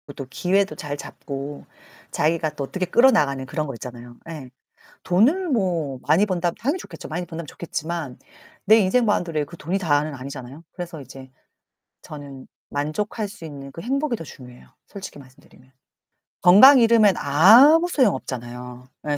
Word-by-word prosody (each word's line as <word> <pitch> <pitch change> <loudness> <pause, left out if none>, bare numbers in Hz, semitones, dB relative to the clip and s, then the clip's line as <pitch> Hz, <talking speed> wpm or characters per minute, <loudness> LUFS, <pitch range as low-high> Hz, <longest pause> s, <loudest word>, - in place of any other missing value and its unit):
또 135 - -7
기회도 195 +6 0
잘 145 -3 -6
잡고 140 0 -8 0.5
자기가 160 -1 0
또 140 - -4
어떻게 185 +6 -3
끌어나가는 150 - +3
그런 150 +2 -4
거 135 - -5
있잖아요. 120 0 -10
예. 145 -6 -8 0.6
돈을 280 - +2
뭐 170 - -1
많이 200 +6 +3
번다면 175 -3 -1
당연히 285 +10 -1
좋겠죠. - - -10
많이 175 +3 -4
번다면 165 -1 -7
좋겠지만 160 -4 -6 0.5
내 220 +2 +7
인생 220 +4 +2
바운더리에 165 -7 0
그 170 +4 -13
돈이 180 +6 -3
다는 150 -3 0
아니잖아요. 135 +2 -9
그래서 175 -3 -8
이제 135 0 -12 0.7
저는 140 -3 -10 0.2
만족할 200 +9 -3
수 185 -4 -12
있는 140 -3 -9
그 165 - -9
행복이 270 +1 -1
더 165 - -9
중요해요, 125 -3 -14 0.2
솔직히 195 -7 -9
말씀드리면. 130 -1 -19 0.7
건강 245 +10 +8
잃으면 225 -4 +5
아무 235 - +6
소용 260 - +2
없잖아요, 125 0 -8 0.2
예 145 - 0
160 Hz, 350 characters per minute, -22 LUFS, 140-200 Hz, 0.7 s, 건강